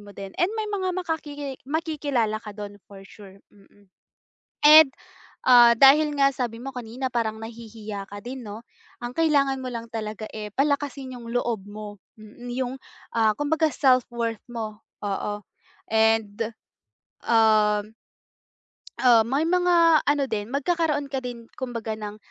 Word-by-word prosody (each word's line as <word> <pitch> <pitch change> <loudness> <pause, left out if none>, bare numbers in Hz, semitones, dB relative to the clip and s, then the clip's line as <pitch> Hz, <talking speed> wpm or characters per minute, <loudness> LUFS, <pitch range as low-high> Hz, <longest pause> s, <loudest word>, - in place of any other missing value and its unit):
mo 205 0 -13
din 195 -1 -8
and 350 - +4
may 435 -1 -2
mga 390 -3 -2
makakiki 295 -6 -4
makikilala 285 -8 -1
ka 210 - -7
dun 205 -1 -7
for 200 -1 -12
sure, 195 -2 -14 0.2
mm. 200 0 -23 0.7
And 305 -1 +9 0.5
ah, 240 -2 +8
dahil 295 +2 +6
nga 275 0 +5
sabi 235 -2 -4
mo 270 - -5
kanina 250 +2 -5
parang 220 -2 -2
nahihiya 220 -3 -8
ka 205 0 -8
din, 250 0 -7
no? 210 +2 -8 0.4
Ang 240 - -3
kailangan 285 -4 +2
mo 260 - -5
lang 230 0 -6
talaga 215 -1 -5
eh, 210 -1 -6
palakasin 275 -2 -1
yung 235 -1 -10
loob 235 -5 -1
mo, 205 0 -9 0.2
mm, 215 +3 -13 0.2
yung 250 0 -3 0.4
ah, 220 -2 +3
kumbaga 310 +1 +1
self-worth 240 -4 +1
mo, 220 -3 -5 0.2
oo. 205 +1 -3 0.5
And, 220 -2 +2 0.9
um 215 -2 +3 1.0
Ah, 240 -3 +5
may 275 +5 +1
mga 340 -2 +4
ano 290 -1 +3
din, 215 -4 -3
magkakaroon 290 0 -1
ka 265 - -1
din 245 -2 -7
kumbaga 235 -3 -5
ng, 210 -1 -6
240 Hz, 145 wpm, -25 LUFS, 215-285 Hz, 1.0 s, And